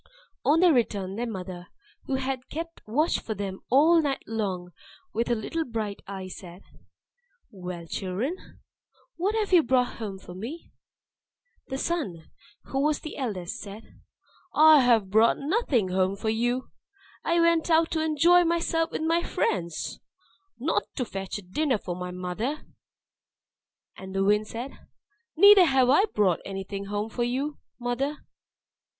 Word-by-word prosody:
On 305 Hz, +4 st, +4 dB
their 355 Hz, -3 st, +6 dB
return, 200 Hz, -6 st, 0 dB
their 235 Hz, +2 st, -3 dB
mother, 180 Hz, -3 st, -7 dB, 0.4 s
who 270 Hz, -, -1 dB
had 265 Hz, -1 st, -3 dB
kept 330 Hz, +2 st, -6 dB
watch 300 Hz, +10 st, +1 dB
for 220 Hz, -, -5 dB
them 195 Hz, -1 st, -4 dB
all 320 Hz, +6 st, +6 dB
night 280 Hz, -3 st, -2 dB
long 190 Hz, -5 st, -3 dB, 0.4 s
with 230 Hz, +1 st, 0 dB
her 240 Hz, -, +2 dB
little 320 Hz, +9 st, -2 dB
bright 220 Hz, -6 st, -4 dB
eye, 190 Hz, -1 st, -6 dB
said, 180 Hz, 0 st, -10 dB, 0.9 s
"Well, 180 Hz, -3 st, -7 dB
children, 195 Hz, -, -3 dB, 0.8 s
what 395 Hz, +5 st, 0 dB
have 425 Hz, -3 st, -1 dB
you 350 Hz, -, +8 dB
brought 250 Hz, -2 st, +1 dB
home 205 Hz, -4 st, -5 dB
for 185 Hz, -1 st, -11 dB
me?" 235 Hz, -, -8 dB, 1.0 s
Then 265 Hz, -, -4 dB
Sun 230 Hz, -, -3 dB, 0.3 s
(who 270 Hz, -, -2 dB
was 300 Hz, 0 st, +1 dB, 0.2 s
eldest) 220 Hz, -5 st, -4 dB
said, 210 Hz, +1 st, -11 dB, 0.5 s
"I 310 Hz, 0 st, +8 dB
have 230 Hz, -7 st, +3 dB
brought 220 Hz, +2 st, +5 dB
nothing 280 Hz, -, +1 dB
home 185 Hz, +1 st, +1 dB
for 215 Hz, +2 st, -2 dB
you. 240 Hz, +3 st, -1 dB, 0.5 s
I 340 Hz, +1 st, +2 dB
went 335 Hz, 0 st, +3 dB
out 325 Hz, 0 st, +4 dB
to 315 Hz, -1 st, 0 dB
enjoy 330 Hz, +3 st, +5 dB
myself 330 Hz, -1 st, +1 dB
with -, -, -4 dB
my 330 Hz, +1 st, +2 dB
friends 170 Hz, -, -2 dB, 0.6 s
not 240 Hz, -5 st, +1 dB
to 250 Hz, -, -1 dB
fetch 195 Hz, -2 st, -5 dB
a 205 Hz, -, -9 dB
dinner 255 Hz, +8 st, 0 dB
for 180 Hz, -3 st, -5 dB
my 180 Hz, 0 st, -5 dB
mother!" 180 Hz, +11 st, -4 dB, 1.3 s
And 190 Hz, 0 st, -9 dB
Wind 210 Hz, +1 st, +3 dB
said, 240 Hz, +5 st, -6 dB, 0.7 s
"Neither 400 Hz, +1 st, +9 dB
have 265 Hz, -4 st, +4 dB
I 380 Hz, +9 st, +5 dB
brought 205 Hz, -, +1 dB
anything 195 Hz, +1 st, -5 dB
home 205 Hz, +2 st, -3 dB
for 240 Hz, -, -1 dB
you, 270 Hz, +5 st, -2 dB, 0.2 s
mother. 255 Hz, +5 st, -2 dB
240 Hz, 145 wpm, -27 LUFS, 195-310 Hz, 1.3 s, Neither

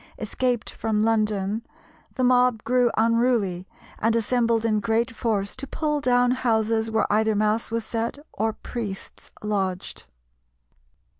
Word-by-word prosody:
escaped 240 Hz, +2 st, -1 dB
from 215 Hz, -1 st, -1 dB
London 215 Hz, -1 st, 0 dB, 0.5 s
the 255 Hz, -, -1 dB
mob 250 Hz, -3 st, +3 dB
grew 250 Hz, 0 st, +3 dB
unruly, 225 Hz, -5 st, +2 dB, 0.3 s
and 225 Hz, +1 st, +2 dB
assembled 230 Hz, 0 st, +1 dB
in 215 Hz, -2 st, +2 dB
great 230 Hz, +2 st, 0 dB
force 215 Hz, -4 st, -2 dB
to 275 Hz, +1 st, -6 dB
pull 300 Hz, +1 st, -1 dB
down 245 Hz, -1 st, +3 dB
houses 225 Hz, -3 st, +1 dB
where 220 Hz, -1 st, +1 dB
either 220 Hz, 0 st, +2 dB
mass 215 Hz, +2 st, +1 dB
was 230 Hz, -1 st, -2 dB
said 230 Hz, +3 st, -3 dB, 0.2 s
or 220 Hz, +2 st, 0 dB
priests 215 Hz, -3 st, -7 dB
lodged. 195 Hz, -3 st, -2 dB
225 Hz, 130 wpm, -24 LUFS, 215-245 Hz, 0.5 s, mob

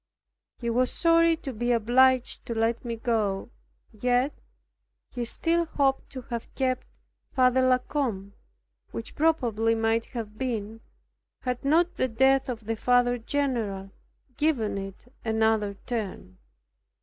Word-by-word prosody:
He 235 Hz, -1 st, -2 dB
was 250 Hz, +2 st, +2 dB
sorry 335 Hz, -1 st, +4 dB
to 270 Hz, -4 st, -6 dB
be 240 Hz, +2 st, -1 dB
obliged 250 Hz, +2 st, +3 dB
to 230 Hz, -, -3 dB
let 225 Hz, +1 st, 0 dB
me 235 Hz, -2 st, -3 dB
go. 220 Hz, -3 st, -1 dB, 0.4 s
Yet 245 Hz, +5 st, +1 dB, 0.8 s
he 245 Hz, -2 st, -3 dB
still 335 Hz, +7 st, +1 dB
hoped 275 Hz, -4 st, 0 dB
to 260 Hz, -2 st, -6 dB
have 235 Hz, -1 st, -6 dB
kept 255 Hz, -1 st, -1 dB, 0.5 s
Father 255 Hz, -1 st, +4 dB
La 255 Hz, 0 st, +5 dB
Combe, 230 Hz, -8 st, -3 dB, 0.6 s
which 230 Hz, -, -7 dB
probably 235 Hz, -8 st, +2 dB
might 225 Hz, 0 st, +1 dB
have 215 Hz, -3 st, -7 dB
been, 225 Hz, -4 st, -3 dB, 0.6 s
had 250 Hz, -1 st, -3 dB
not 335 Hz, +5 st, +2 dB
the 260 Hz, -, +2 dB
death 265 Hz, +3 st, +3 dB
of 230 Hz, -3 st, -5 dB
the 225 Hz, +1 st, -1 dB
Father 245 Hz, +1 st, +2 dB
general 225 Hz, -7 st, -2 dB, 0.5 s
given 245 Hz, -10 st, +1 dB
it 195 Hz, +2 st, -8 dB, 0.2 s
another 220 Hz, -2 st, +1 dB
turn. 200 Hz, -, -5 dB
240 Hz, 130 wpm, -27 LUFS, 225-260 Hz, 0.8 s, La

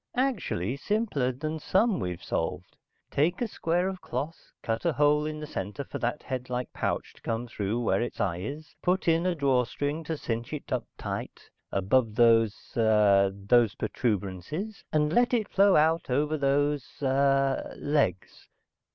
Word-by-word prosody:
"Actually 190 Hz, -, 0 dB
simpler 150 Hz, -, 0 dB
than 155 Hz, +5 st, -4 dB
some 200 Hz, +7 st, +2 dB
we've 90 Hz, -3 st, -4 dB
solved. -, -, -3 dB, 0.4 s
Take 155 Hz, +5 st, +1 dB
a 240 Hz, -, 0 dB
square 175 Hz, -2 st, 0 dB
of 190 Hz, -1 st, -5 dB
cloth, 160 Hz, +4 st, -5 dB
cut 115 Hz, 0 st, -2 dB
a 170 Hz, -, +2 dB
hole 150 Hz, +2 st, +3 dB
in 155 Hz, 0 st, -4 dB
the 150 Hz, -, -5 dB
center 105 Hz, -1 st, -5 dB
for -, -, -7 dB
that 120 Hz, +5 st, -2 dB
headlike 125 Hz, -1 st, -4 dB
pouch -, -, -2 dB
to -, -, -21 dB
come 115 Hz, +1 st, -2 dB
through 110 Hz, 0 st, -2 dB
where 115 Hz, -, +1 dB
its 120 Hz, -, -4 dB
eye 90 Hz, -4 st, 0 dB
is, 145 Hz, -, -7 dB
put 180 Hz, +1 st, +1 dB
in 165 Hz, +2 st, +3 dB
a 180 Hz, -, +1 dB
draw 135 Hz, -4 st, +2 dB
string 145 Hz, +6 st, -3 dB
to 160 Hz, 0 st, -3 dB
cinch 115 Hz, 0 st, -4 dB
it 150 Hz, -, -6 dB
up 120 Hz, -4 st, -1 dB
tight, -, -, -6 dB, 0.2 s
above 105 Hz, +3 st, +2 dB
those 115 Hz, -2 st, +3 dB
ah 105 Hz, -3 st, +4 dB
those 100 Hz, +2 st, +2 dB
protuberances, 115 Hz, -, -3 dB
and 150 Hz, 0 st, +2 dB
let 245 Hz, +3 st, +4 dB
it 220 Hz, -3 st, 0 dB
flow 200 Hz, -1 st, +4 dB
out 160 Hz, +1 st, +3 dB
over 150 Hz, +4 st, +1 dB
those 145 Hz, 0 st, +1 dB, 0.2 s
ah 135 Hz, 0 st, +3 dB, 0.2 s
legs. 145 Hz, -9 st, -1 dB
140 Hz, 165 wpm, -28 LUFS, 115-160 Hz, 0.4 s, ah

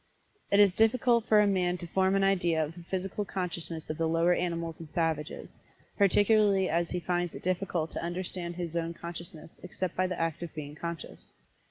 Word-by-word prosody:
It 200 Hz, -, +4 dB
is 200 Hz, -3 st, +6 dB
difficult 235 Hz, +2 st, +3 dB
for 215 Hz, -1 st, +6 dB
a -, -, +4 dB
man 180 Hz, -3 st, +1 dB
to 175 Hz, -, -7 dB
form 190 Hz, +3 st, +2 dB
an 195 Hz, -, +3 dB
idea 175 Hz, -5 st, +2 dB
of 150 Hz, -, -9 dB
the 175 Hz, -, -11 dB
Physical 190 Hz, +3 st, -3 dB
Consciousness 170 Hz, -4 st, -4 dB
of 155 Hz, -, -5 dB
the 165 Hz, -, +2 dB
lower 165 Hz, +2 st, +3 dB
animals 170 Hz, -2 st, -2 dB
and 165 Hz, -2 st, -9 dB
savages, 160 Hz, -1 st, -2 dB, 0.5 s
particularly 205 Hz, -1 st, +4 dB
as 170 Hz, +1 st, 0 dB
he 180 Hz, -, -2 dB
finds 175 Hz, -1 st, -1 dB
it -, -, -9 dB
difficult 180 Hz, -3 st, -1 dB
to -, -, -4 dB
understand 175 Hz, 0 st, -4 dB
his 170 Hz, -2 st, -5 dB
own 170 Hz, 0 st, -2 dB
consciousness 170 Hz, -2 st, -8 dB
except 180 Hz, 0 st, -4 dB
by 185 Hz, 0 st, +1 dB
the 180 Hz, -1 st, -4 dB
act 165 Hz, -1 st, -1 dB
of 170 Hz, -2 st, -7 dB
being 150 Hz, -1 st, -6 dB
conscious. 170 Hz, +2 st, -7 dB
175 Hz, 195 wpm, -29 LUFS, 165-190 Hz, 0.5 s, is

